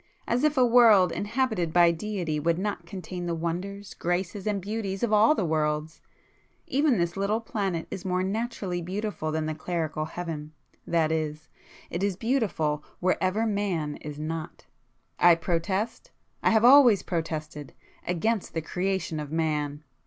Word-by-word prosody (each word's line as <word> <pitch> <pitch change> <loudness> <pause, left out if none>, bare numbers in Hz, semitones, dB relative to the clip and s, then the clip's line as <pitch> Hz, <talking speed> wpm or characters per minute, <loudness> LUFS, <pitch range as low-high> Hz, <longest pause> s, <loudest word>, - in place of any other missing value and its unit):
As 245 +4 +1
if 305 -1 +2
a 255 - +6
World 230 -6 +6
inhabited 215 -6 -1
by 170 0 +6
Deity 170 -3 -3
would 165 +2 +1
not 190 -3 -3
contain 180 -1 -6
the 170 - -1
wonders, 185 +5 -4
graces 180 +3 -2
and 205 -2 0
beauties 200 0 -4
of 225 -2 +1
all 220 +8 +6
worlds! 155 - -1 0.6
Even 280 -2 +2
this 170 -1 0
little 200 +3 0
planet 195 -7 -3
is 185 - -5
more 185 0 0
naturally 200 -3 -2
beautiful 190 -2 -3
than 155 0 -1
the 155 - -2
clerical 155 -1 -3
Heaven,—that 160 0 -3
is, 155 -1 -3 0.4
it 170 - -3
is 200 -2 0
beautiful 195 - 0 0.2
wherever 185 +4 +1
Man 190 -8 -1
is 150 -1 -8
not. 155 +1 -5 0.5
I 175 -1 +7
protest—I 190 - -2
have 225 0 +4
always 250 -5 +7
protested,—against 165 - -4
the 160 - 0
creation 180 -2 -2
of 150 -1 -6
Man!" 150 -2 -1
180 Hz, 140 wpm, -27 LUFS, 160-210 Hz, 0.6 s, I